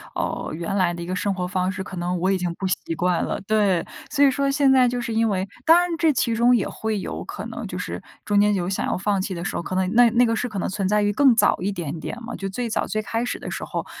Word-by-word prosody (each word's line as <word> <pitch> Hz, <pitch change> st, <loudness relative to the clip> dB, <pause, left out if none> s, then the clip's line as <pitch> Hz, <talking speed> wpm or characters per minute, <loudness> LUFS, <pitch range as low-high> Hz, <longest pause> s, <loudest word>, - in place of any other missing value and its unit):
呃， -, -, -3 dB
原 170 Hz, +4 st, -3 dB
来 185 Hz, -3 st, +2 dB
的 170 Hz, -, -7 dB
一 -, -, -5 dB
个 185 Hz, +2 st, -3 dB
生 200 Hz, +2 st, 0 dB
活 180 Hz, -1 st, -3 dB
方 185 Hz, 0 st, 0 dB
式， 190 Hz, 0 st, -5 dB
可 190 Hz, 0 st, -8 dB
能 175 Hz, +1 st, -1 dB
我 185 Hz, +3 st, +1 dB
已 190 Hz, -, +2 dB
经 175 Hz, -1 st, -1 dB
不 195 Hz, -, -5 dB
习 170 Hz, -2 st, -2 dB
惯 175 Hz, +1 st, +1 dB
了， -, -, -2 dB
对。 200 Hz, -3 st, +1 dB, 0.2 s
所 285 Hz, -1 st, +4 dB
以 275 Hz, -, +5 dB
说 280 Hz, 0 st, 0 dB
现 275 Hz, -1 st, +3 dB
在 255 Hz, -2 st, +5 dB
就 245 Hz, 0 st, -2 dB
是 235 Hz, -1 st, -3 dB
因 225 Hz, 0 st, +2 dB
为 190 Hz, -1 st, -1 dB, 0.2 s
当 330 Hz, +2 st, +7 dB
然 355 Hz, -, +1 dB
这 325 Hz, -2 st, +3 dB
其 240 Hz, -4 st, 0 dB
中 240 Hz, +2 st, +5 dB
也 220 Hz, -, 0 dB
会 220 Hz, -2 st, -3 dB
有 -, -, -5 dB
可 -, -, -7 dB
能 -, -, -6 dB
就 -, -, -6 dB
是， -, -, -5 dB, 0.2 s
中 205 Hz, -1 st, +3 dB
间 210 Hz, 0 st, +3 dB
有 175 Hz, -2 st, -1 dB
想 190 Hz, -, -1 dB
要 -, -, 0 dB
放 195 Hz, +1 st, 0 dB
弃 195 Hz, 0 st, -3 dB
的 170 Hz, 0 st, -5 dB
时 -, -, -3 dB
候， -, -, -1 dB
可 185 Hz, -, -4 dB
能 185 Hz, 0 st, +1 dB
那 240 Hz, 0 st, +6 dB
那 245 Hz, +2 st, +4 dB
个 230 Hz, -1 st, +1 dB
是 245 Hz, +3 st, -2 dB
可 215 Hz, -, -6 dB
能 -, -, -1 dB
存 195 Hz, -1 st, -2 dB
在 210 Hz, +1 st, +2 dB
于 205 Hz, 0 st, +1 dB
更 265 Hz, +1 st, +5 dB
早 -, -, +4 dB
一 195 Hz, +3 st, -1 dB
点 170 Hz, -5 st, -4 dB
点 -, -, -5 dB
嘛 235 Hz, +1 st, -6 dB
就 195 Hz, -, -4 dB
最 240 Hz, +5 st, -3 dB
早 220 Hz, -, -1 dB
最 215 Hz, -, -2 dB
开 225 Hz, +2 st, -2 dB
始 245 Hz, -, -2 dB
的 -, -, -6 dB
时 -, -, -4 dB
候， -, -, -4 dB
205 Hz, 330 characters per minute, -23 LUFS, 185-240 Hz, 0.2 s, 当